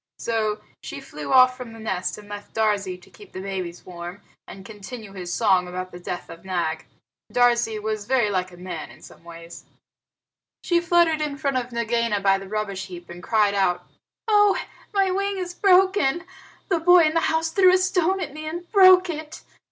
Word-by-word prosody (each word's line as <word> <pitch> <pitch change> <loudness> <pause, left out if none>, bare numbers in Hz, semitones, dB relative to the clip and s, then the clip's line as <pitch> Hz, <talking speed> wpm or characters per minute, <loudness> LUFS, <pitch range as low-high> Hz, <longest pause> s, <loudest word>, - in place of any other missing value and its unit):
So 220 -2 -1 0.2
she - - -7
flew - - -8
off 255 -1 +6
from 250 -3 -9
the 225 - -11
nest, 190 -5 -3
and 210 -1 -13
left 205 0 -9
Darzee 205 -4 0
to - - -18
keep 415 - -16
the - - -6
babies 185 -3 -5
warm, 175 +2 -9 0.2
and 195 0 -11
continue 215 0 -9
his 180 -2 -6
song 185 -4 +2
about 185 +1 -6
the 175 - -10
death 175 0 -6
of 165 - -12
Nag. 175 -4 -2 0.4
Darzee 240 -2 +2
was 215 0 -3
very 245 -6 +2
like 185 -1 -1
a 175 - -14
man 180 -3 -7
in - - -16
some - - -15
ways. 170 0 -11 1.0
She 345 -1 +2
fluttered 340 -2 +3
in 295 -2 -3
front 275 -3 -1
of 250 -1 -3
Nagaina 235 -2 0
by 195 -1 +3
the 195 0 -10
rubbish 200 -2 -3
heap 175 -2 -10
and 175 +1 -10
cried 210 0 +2
out, 190 -3 0 0.4
"Oh, 415 -2 +4 0.3
my 390 -2 +2
wing 395 +1 -1
is 360 -1 -4
broken! 370 -5 +3 0.5
The 345 -4 +2
boy 355 +1 +6
in 310 0 +2
the 330 - +3
house 320 0 0
threw 370 +1 +5
a 370 - +5
stone 370 0 +1
at 350 -6 -5
me 310 +1 -7
and 345 +2 -6
broke 370 -2 +7
it." 310 -2 -7
225 Hz, 195 wpm, -23 LUFS, -, 1.0 s, broke